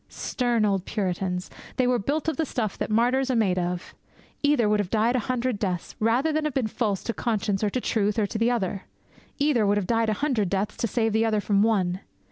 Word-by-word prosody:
Stern 240 -4 0
old 195 -2 0
Puritans! 180 -2 -2 0.2
They 255 - +2
were 245 -1 +2
built 290 +9 -1
of 315 -4 0
the - - +1
stuff 220 -6 -2
that - - -2
martyrs 250 +5 +2
are 255 - +1
made 195 -5 +2
of. 180 0 -3 0.5
Either 285 -6 +3
would 210 0 +2
have 200 -3 -1
died 225 +3 +2
a - - +3
hundred 250 -3 0
deaths 180 -4 -3
rather 245 +8 +2
than 310 0 0
have 300 - -2
been 265 -4 +1
false 215 -3 -1
to 230 - -2
conscience, 215 -4 -1
or 210 - +2
to 255 - -1
truth, 210 -3 0
or 215 - +2
to 215 +2 -4
the 230 +1 +3
other. 195 -5 -2 0.5
Either 285 -6 +2
would 205 0 +2
have 205 - 0
died 225 +1 +1
a - - +2
hundred 225 -6 0
deaths 200 +2 -1
to 230 - 0
save 225 0 0
the 220 +1 +3
other 220 -2 +2
from 200 -1 +2
one. 190 -5 +1
220 Hz, 235 wpm, -25 LUFS, 200-245 Hz, 0.5 s, Either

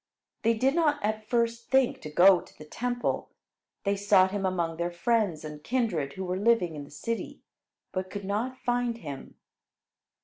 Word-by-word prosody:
They 230 +1 +3
did 260 +5 +2
not 310 -3 +3
at 215 0 -2
first 235 -1 0
think 265 -1 +3
to 155 - -7
go 180 +4 +6
to - - -18
the 155 - -11
Temple. 245 +9 -2 0.5
They 200 0 +1
sought 190 -2 +4
him 195 -1 -1
among 170 -3 -1
their 170 +1 -1
friends 175 -3 0
and 150 -1 -8
kindred 195 - -1
who 190 - -5
were 180 +1 -2
living 205 -6 +3
in 145 -1 -6
the - - -16
city, 230 +10 -5 0.5
but 185 0 -3
could 200 0 -6
not 225 +6 -2
find 245 -2 -1
him. 145 -9 -8
200 Hz, 175 wpm, -28 LUFS, 175-235 Hz, 0.5 s, go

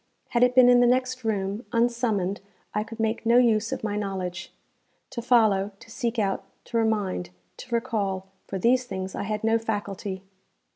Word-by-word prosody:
Had 240 - +1
it 250 0 +4
been 255 -1 +8
in 245 0 +7
the 245 - +5
next 255 0 +1
room, 205 0 -1
unsummoned 230 -5 0 0.3
I 210 - 0
could 225 +1 -10
make 220 0 0
no 235 +1 +4
use 225 -3 +3
of - - -4
my 210 -1 -1
knowledge. 190 -3 -4 0.6
To 235 - -4
follow, 215 -5 +3
to 230 -1 -15
seek 235 +1 -2
out, 195 -3 0 0.2
to 235 - -2
remind, 205 - 0 0.3
to 240 -2 -4
recall 200 -5 -1 0.2
for 195 - -3
these 250 +6 +3
things 190 -4 -5
I - - -3
had 215 +1 -3
no 225 +1 +3
faculty. 205 -3 -4
220 Hz, 180 wpm, -26 LUFS, 195-235 Hz, 0.6 s, been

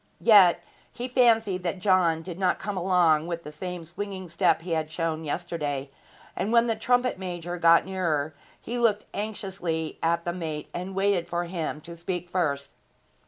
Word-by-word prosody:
Yet 200 -6 +6 0.3
he 245 - -5
fancied 225 -7 +3
that 180 +1 -2
John 180 -4 +2
did 175 0 -7
not 185 - +2
come 205 0 -4
along 175 -4 +3
with 170 -1 -4
the 150 - -8
same 175 +2 -6
swinging 185 +1 -6
step 165 0 +2
he 175 - -6
had 160 -1 -1
shown 160 -1 -2
yesterday; 145 -4 -3 0.4
and 210 - -2
when 235 0 +5
the 225 -2 0
trumpet 245 0 +1
major 175 -1 -5
got 170 0 +6
nearer 160 -6 -1 0.3
he 240 +1 -4
looked 215 -3 +2
anxiously 190 -6 -3
at 170 +1 +1
the 175 - -1
mate 160 -4 -5
and 185 +2 -5
waited 195 -3 +1
for 175 0 -1
him 170 -3 -4
to 170 +2 -9
speak 175 +1 -5
first. 140 -6 -1
175 Hz, 170 wpm, -26 LUFS, 165-195 Hz, 0.4 s, Yet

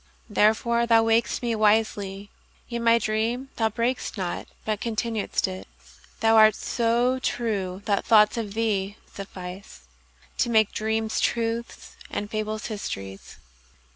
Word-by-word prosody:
Therefore 235 +3 +2
thou 225 -1 +5
waked'st 225 +2 +1
me 235 -1 0
wisely; 210 -2 +1 0.4
yetMy 235 0 +3
dream 230 +5 -1
thou 225 -1 +2
brak'st 235 +1 -2
not, 180 -3 -3 0.2
but 215 -1 -2
continued'st 225 -3 -1
it:Thou 205 +4 -3
art 215 -1 +7
so 240 +2 +1
true 200 -7 -2
that 200 -2 +1
thoughts 210 -2 +5
of 215 -3 -4
thee 205 -3 -1 0.2
sufficeTo 70 - -7
make 220 -3 +3
dreams 220 0 -1
truths 230 0 -2
and 205 +1 -4
fables 215 0 -3
histories. 95 - -6
220 Hz, 115 wpm, -25 LUFS, 200-230 Hz, 0.4 s, art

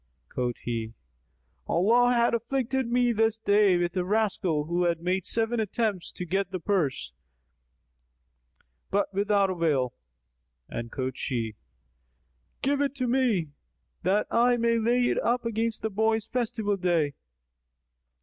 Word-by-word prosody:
Quoth 125 -1 -2
he, 115 -2 -3 0.7
"Allah 235 +8 +4
hath 235 -1 +3
afflicted 260 +2 -1
me 245 0 +3
this 225 -1 +1
day 205 -3 +4
with 175 +1 -1
a 180 - +1
rascal 190 -6 0
who 175 +3 +1
made 180 +2 -1
seven 225 +1 0
attempts 215 -3 -1
to 180 - -5
get 195 +1 -1
the 185 -1 -4
purse, 170 -7 -1 1.8
but 200 0 0
without 200 -1 +2
avail;" 150 -8 0 0.7
and 115 0 -6
quoth 130 -1 -3
she, 115 -4 -3 1.1
"Give 280 +1 +1
it 285 -1 0
to 255 -2 -2
me, 235 - +1 0.5
that 195 +4 +2
I 240 +1 +4
may 230 0 +2
lay 240 +2 +2
it - - +1
up 240 0 0
against 230 0 -2
the 220 - -1
boy's 220 +1 +1
festival 225 -4 -1
day." 170 -6 +1
205 Hz, 130 wpm, -27 LUFS, 175-235 Hz, 1.8 s, Allah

